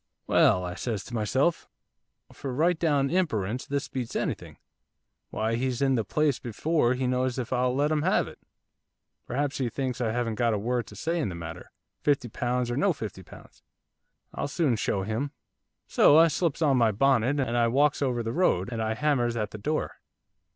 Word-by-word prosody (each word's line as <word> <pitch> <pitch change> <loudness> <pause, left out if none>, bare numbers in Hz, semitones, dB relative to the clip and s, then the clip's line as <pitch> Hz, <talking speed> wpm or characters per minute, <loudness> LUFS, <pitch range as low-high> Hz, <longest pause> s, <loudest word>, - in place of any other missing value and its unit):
'"Well," 90 0 +4
I 90 - -4
says 105 0 -3
to 120 - -11
myself, 130 +9 0 0.6
"for 135 - -6
right 160 +6 +1
down 145 -4 +2
imperence 125 - -1
this 140 0 -2
beats 125 -3 -5
anything, - - -3 0.7
why 110 +1 -1
he's 125 0 -1
in 135 -1 +2
the 115 -3 +1
place 150 +2 +1
before 125 +2 0
he 130 +1 -2
knows 125 0 0
if 125 -1 -3
I'll 125 0 +1
let 145 +3 +1
him 155 -1 +1
have - - +2
it. - - -12 0.9
Perhaps 140 +3 -2
he 125 -3 0
thinks 130 0 -3
I 115 -2 0
haven't 115 -1 -2
got 115 -2 +2
a - - 0
word 120 +3 -1
to - - -12
say 170 +1 -2
in 145 - -1
the 90 - -6
matter, 80 -1 -8 0.3
fifty 140 -4 +1
pounds 120 +2 -1
or 120 - -2
no 195 +4 +3
fifty 105 -9 -7
pounds, - - -15 0.7
I'll - - -3
soon 145 -4 +1
show 100 -2 -1
him." 115 +8 -3 0.5
So 145 - +5
I 165 +1 +7
slips 165 0 -1
on 140 -4 +3
my 115 -3 +4
bonnet, 135 +4 +2
and 125 -3 -1
I 120 -1 +3
walks 140 +5 +2
over 125 -4 0
the 115 +1 -3
road, 115 - +1
and 115 -1 -3
I 110 0 -1
hammers 125 -4 +1
at 105 -2 -2
the 110 - -8
door. 155 +9 -2
125 Hz, 195 wpm, -27 LUFS, 115-145 Hz, 0.9 s, I